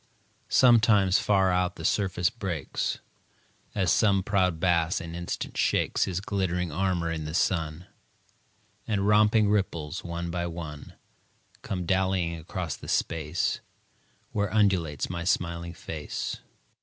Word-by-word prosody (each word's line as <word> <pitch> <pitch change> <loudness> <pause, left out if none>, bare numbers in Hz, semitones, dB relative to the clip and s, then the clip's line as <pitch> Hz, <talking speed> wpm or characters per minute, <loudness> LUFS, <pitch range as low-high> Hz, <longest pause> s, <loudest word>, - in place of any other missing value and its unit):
Sometimes, 110 -6 +5
far 95 -2 +3
out, 90 0 +1
the 80 - -7
surface 95 -3 +1
breaks, 95 - -3 0.8
As 95 -5 +2
some 100 -3 +3
proud 90 -4 +1
bass 85 -1 +2
an 85 0 -7
instant 85 +1 -4
shakes - - +2
His 95 -1 -3
glittering 90 -4 -1
armor 85 0 0
in 80 -2 -3
the 75 +2 -4
sun, 80 -2 0 1.0
And 100 -2 0
romping 105 0 +5
ripples, 90 -5 -1
one 85 0 -4
by 85 0 -2
one, 80 -3 -7 0.7
Come 90 -2 -4
dallyiong 95 -2 0
across 85 -1 -4
the - - -11
space 75 -2 0 0.7
Where 100 -2 -1
undulates 95 -8 +1
my 85 -2 -4
smiling 85 -1 -1
face. 80 -2 -5
90 Hz, 125 wpm, -27 LUFS, 85-95 Hz, 1.0 s, Sometimes